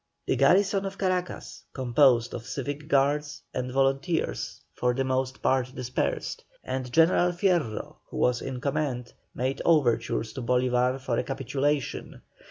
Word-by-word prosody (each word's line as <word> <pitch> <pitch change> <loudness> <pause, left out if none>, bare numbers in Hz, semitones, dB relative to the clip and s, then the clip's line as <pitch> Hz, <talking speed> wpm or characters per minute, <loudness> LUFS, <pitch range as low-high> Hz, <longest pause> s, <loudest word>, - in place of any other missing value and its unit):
The - - +1
garrison 190 +9 +4
of 195 0 -7
Caracas, 185 -2 -2
composed 125 -2 +3
of 120 - -6
civic 145 +2 -4
guards 145 0 +1
and 125 0 -3
volunteers, 135 +5 0
for 125 0 0
the 135 - +1
most 130 0 -2
part 130 0 +1
dispersed, 130 -1 -2 0.2
and 130 -1 -4
General 170 +3 +4
Fierro, 175 - 0
who - - -7
was 125 -1 +2
in 130 -2 -4
command, 135 -3 -2 0.2
made 130 +2 -1
overtures 115 -7 +2
to 130 - -5
Bolívar 125 +1 +1
for 130 -3 -1
a - - 0
capitulation. 135 +1 -2
135 Hz, 140 wpm, -27 LUFS, 125-150 Hz, 0.2 s, garrison